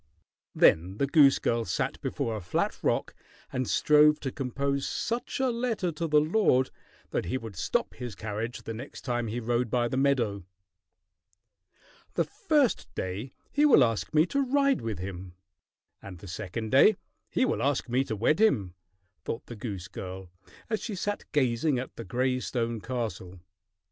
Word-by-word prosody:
Then 90 +5 +4
the 140 - +2
goose 140 -1 +6
girl 115 0 0
sat 90 -4 -2
before 115 - -2
a 105 - -5
flat 90 - -1
rock - - 0 0.4
and 130 -1 -1
strove 150 0 +5
to 135 - -3
compose 140 +1 -2
such 235 +3 -3
a 260 -1 +2
letter 230 -7 -1
to 165 +2 -3
the 150 -1 +5
lord 155 -5 +2 0.4
that - - -1
he 90 - -1
would 115 -5 -8
stop - - -1
his 120 -5 -7
carriage 110 +4 -4
the 115 - -5
next 125 +6 -8
time 120 -2 -2
he 115 +3 -3
rode 120 +1 0
by 120 +1 +1
the 130 - -2
meadow. 120 -8 +1 1.7
"The - - +3
first 295 -7 +1
day 100 +8 -4 0.2
he 290 - +2
will 275 - +7
ask 115 -3 -1
me 155 +1 +4
to 280 +9 0
ride 275 +1 +2
with 110 -2 -3
him, 90 -1 -7 0.7
and 95 -2 -9
the 100 - -12
second 110 +4 -5
day 140 +11 +6 0.3
he 260 - +2
will - - -1
ask 140 -1 0
me 125 +2 +2
to 110 - -3
wed 135 - +2
him," 105 - +3 0.5
thought 115 - -4
the 120 - -8
goose 100 -4 -6
girl, 95 -2 -8 0.4
as 220 -1 -2
she 215 - -4
sat 205 +2 -3
gazing 130 0 +2
at 125 +1 -5
the 115 - -6
gray 130 +2 0
stone 115 -3 -2
castle. 105 -7 -4
125 Hz, 170 wpm, -28 LUFS, 110-150 Hz, 1.7 s, will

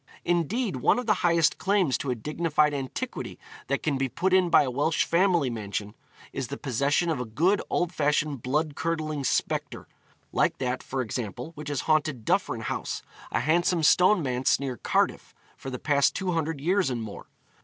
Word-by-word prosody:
Indeed 175 - 0
one 125 - +3
of 250 - -2
the 215 - +4
highest 170 -2 +3
claims 190 -8 +2
to 140 - -3
a 125 - 0
dignified 150 +3 +1
antiquity 140 - -5 0.3
that - - -1
can 140 -3 0
be 135 -1 0
put 185 +8 0
in 185 -2 +4
by 155 - +6
a 130 - -2
Welsh 150 +5 +1
family 170 -6 +2
mansion, 105 -2 -4 0.4
is 135 -3 -3
the 140 - -6
possession 140 +6 +1
of 155 - -2
a 125 - -3
good 170 - +1
old 175 0 0
fashioned 150 -3 0
blood 150 +5 0
curdling 155 -3 -2
spectre - - -1 0.4
like - - +1
that, 125 -1 -2
for 130 -1 -3
example, 120 +6 -5
which 150 -1 -7
has 145 - -1
haunted 155 -7 0
Duffryn - - 0
House, - - -4 0.3
a - - +1
handsome 170 +1 +2
stone 180 +4 +5
manse 125 -1 +1
near 135 -2 -3
Cardiff, - - -1 0.2
for 135 - -8
the 125 - -4
past 140 +1 +2
two 185 -1 -1
hundred 160 -3 -1
years 180 +3 +1
and 120 -3 -3
more. 105 -2 -9
150 Hz, 185 wpm, -27 LUFS, 130-170 Hz, 0.4 s, by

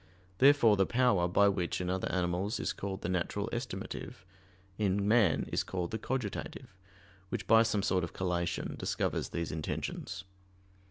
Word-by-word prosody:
Therefore 135 -6 +6
the 95 - +3
power 115 -8 +3
by 100 +3 +4
which 95 -3 0
in 90 - -2
other 95 +1 -1
animals 90 +5 -1
is - - -1
called 95 -1 -5
the - - -1
natural 90 -1 -1
estimative, 90 - -5 0.5
in 100 -1 +1
man 105 -7 +3
is - - +1
called 90 -2 -3
the 110 - -3
"cogitative," 120 -5 -4 0.6
which - - -3
by 115 0 +6
some 110 -3 +1
sort 90 -2 +1
of 85 - -4
collation 85 -2 -2
discovers - - -1
these 85 -1 -3
intentions. 85 +4 -4
95 Hz, 155 wpm, -32 LUFS, 90-105 Hz, 0.6 s, Therefore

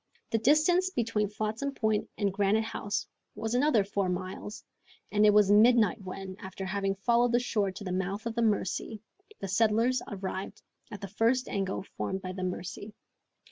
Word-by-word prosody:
The 225 - +2
distance 310 +9 +4
between 225 - -1
Flotsam 215 +6 -3
Point 220 -2 0
and 200 -2 0
Granite 205 +2 +2
House 205 -2 -3 0.3
was 220 +2 -3
another 250 -4 +3
four 195 -1 -1
miles, 185 +3 -5 0.5
and 210 0 +4
it - - +8
was 205 -1 +5
midnight 220 -1 +5
when, 190 0 -7
after 190 0 -7
having 195 0 -1
followed 235 +4 +2
the 240 - +5
shore 215 -5 0
to 200 - -8
the 185 - -4
mouth 195 +4 -2
of 230 - -2
the 235 - -1
Mercy, 215 0 0 0.4
the 195 - -3
settlers 225 +5 +2
arrived 190 -1 -5 0.3
at 210 -3 -8
the 200 - -5
first 230 +6 +1
angle 195 -1 -2
formed 190 0 -4
by 185 - -4
the 185 0 -6
Mercy. 185 +3 -5
210 Hz, 175 wpm, -29 LUFS, 195-230 Hz, 0.5 s, it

